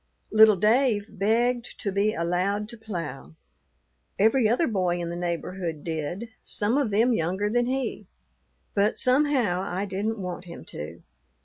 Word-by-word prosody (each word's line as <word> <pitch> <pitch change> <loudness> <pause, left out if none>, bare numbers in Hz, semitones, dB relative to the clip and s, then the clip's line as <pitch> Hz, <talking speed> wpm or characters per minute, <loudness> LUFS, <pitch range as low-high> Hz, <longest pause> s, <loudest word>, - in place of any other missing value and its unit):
"Little 215 -1 +7
Dave 215 +1 +2
begged 235 +4 +1
to 200 - -2
be 200 +2 +1
allowed 185 +5 0
to 235 - -9
plough. 165 - -6 0.8
Every 220 +3 +4
other 250 +9 +2
boy 185 -5 0
in 170 -1 -3
the - - -4
neighborhood 175 -2 -3
did, 165 +7 -4
some 215 +4 0
of 280 -5 +2
them 225 +5 +3
younger 190 +2 0
than 240 +1 +2
he, 255 -6 -2 0.7
but 205 +1 +2
somehow 255 -8 +2
I 190 +1 -2
didn't 205 +3 -2
want 180 -2 -5
him 170 - -10
to. 80 +3 -8
205 Hz, 145 wpm, -26 LUFS, 175-230 Hz, 0.8 s, Little